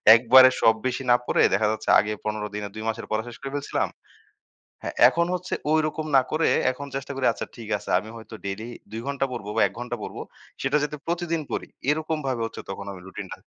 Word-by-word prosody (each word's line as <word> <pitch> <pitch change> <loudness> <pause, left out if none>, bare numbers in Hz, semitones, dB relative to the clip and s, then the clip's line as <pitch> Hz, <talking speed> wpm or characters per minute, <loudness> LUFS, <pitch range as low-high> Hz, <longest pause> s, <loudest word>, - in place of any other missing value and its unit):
একবারে 130 +2 +8
সব 110 - +6
বেশি 130 +1 -2
না 120 - +8
পড়ে - - +2
দেখা 105 +2 +2
যাচ্ছে 110 0 -4
আগে 105 +2 0
১৫ 105 0 -2
দিনে 105 -1 -3
২ 110 - -5
মাসের 115 +1 -4
পড়া 110 0 0
শেষ 120 - -9
করে 135 0 -5
ফেলছিলাম। 145 0 -1 0.9
হ্যাঁ, - - -4
এখন 170 +6 +1
হচ্ছে 180 0 -3 0.2
ঐরকম 155 0 +1
না 130 - +7
করে 160 +1 +2 0.2
এখন 140 +2 -8
চেষ্টা 135 +1 -4
করি 135 - 0
আচ্ছা - - -6
ঠিক 115 -2 -9
আছে। - - -9
আমি 110 +3 -7
হয়তো 110 0 -11
ডেইলি 105 +4 -4 0.2
২ 115 - -4
ঘণ্টা 140 -1 0
পড়ব 115 -5 -6
বা - - +3
১ - - -6
ঘণ্টা 120 0 -4
পড়ব, - - -6 0.4
সেটা 135 +2 +2
যাতে 150 0 -4
প্রতিদিন 170 -1 -1
পড়ি - - -3 0.2
এরকমভাবে 150 -6 -1
হচ্ছে - - -8
তখন 100 +1 -5
আমি 95 - -10
রুটিনটা 95 - -7
125 Hz, 210 wpm, -25 LUFS, 110-150 Hz, 0.9 s, একবারে